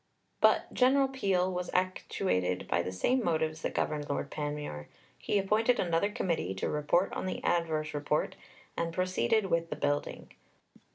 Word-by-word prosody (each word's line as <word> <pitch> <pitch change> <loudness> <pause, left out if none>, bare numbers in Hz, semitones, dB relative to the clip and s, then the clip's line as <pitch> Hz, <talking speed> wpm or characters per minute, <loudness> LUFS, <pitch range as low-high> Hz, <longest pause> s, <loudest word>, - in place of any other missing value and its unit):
But - - +3
General 270 +2 +4
Peel 195 -8 0
was 180 0 -3
actuated 180 - 0
by 85 - +1
the 90 - -4
same 245 - +1
motives 160 -3 0
that - - -3
governed 150 -1 -1
Lord 140 0 -2
Panmure. 145 - -4 0.3
He - - -1
appointed 215 +5 +2
another 170 +2 +1
Committee 170 - -1
to 95 - -2
report 150 +5 +1
on - - -3
the - - -3
adverse 160 -3 0
Report, 150 +1 -1 0.4
and 170 0 -1
proceeded 185 - +1
with 170 0 +1
the - - -3
building. 145 -1 -2
170 Hz, 155 wpm, -31 LUFS, 150-190 Hz, 0.4 s, General